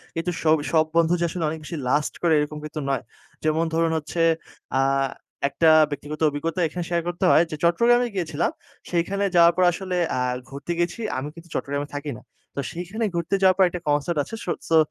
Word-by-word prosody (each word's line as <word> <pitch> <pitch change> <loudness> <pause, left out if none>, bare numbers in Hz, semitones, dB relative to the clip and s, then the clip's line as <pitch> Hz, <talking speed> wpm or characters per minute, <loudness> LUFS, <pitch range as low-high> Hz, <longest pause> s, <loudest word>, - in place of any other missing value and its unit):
কিন্তু 165 +2 -1
সব 155 0 +5 0.2
সব 160 -1 +4
বন্ধু 170 0 +4
যে, 175 - 0
আসলে 170 -1 -4
অনেক 160 0 -5
বেশি 160 +1 -6
লাস্ট 145 +2 +1
করে 170 -2 +3
এরকম 150 +1 -2
কিন্তু 155 0 -5
নয়। 135 -4 0 0.4
যেমন 155 +1 +2
ধরুন 165 0 +2
হচ্ছে 155 +2 -5 0.6
আ - - +4 0.7
একটা 160 +4 +3 0.2
ব্যক্তিগত 145 +2 -6
অভিজ্ঞতা 165 +5 -3
এখানে 175 +2 -4
শেয়ার 170 -1 +1
করতে 175 +2 -1
হয়, 165 - +6
যে, 155 - -4
চট্টগ্রামে 240 +8 +4
গিয়েছিলাম। 160 -3 -1 0.4
সেইখানে 190 +4 0
যাওয়ার 170 0 +7
পর 185 - +4
আসলে 185 +1 -4 0.2
আ - - 0 0.3
ঘুরতে 140 +5 -6
গিয়েছি। 175 +6 -1 0.2
আমি 135 +3 -3
কিন্তু 170 0 -13
চট্টগ্রামে 145 +1 -2
থাকি 145 0 -4
না। - - -14 0.3
তো - - -3
সেইখানে 195 +7 -3
ঘুরতে 170 +3 0
যাওয়ার 185 -1 +5
পর 190 - +6
একটা 175 0 -6
কনসার্ট 145 +3 +1
আছে। 225 - -7
সোট 175 - -2
সো 165 - +5
165 Hz, 195 wpm, -24 LUFS, 150-175 Hz, 0.7 s, যাওয়ার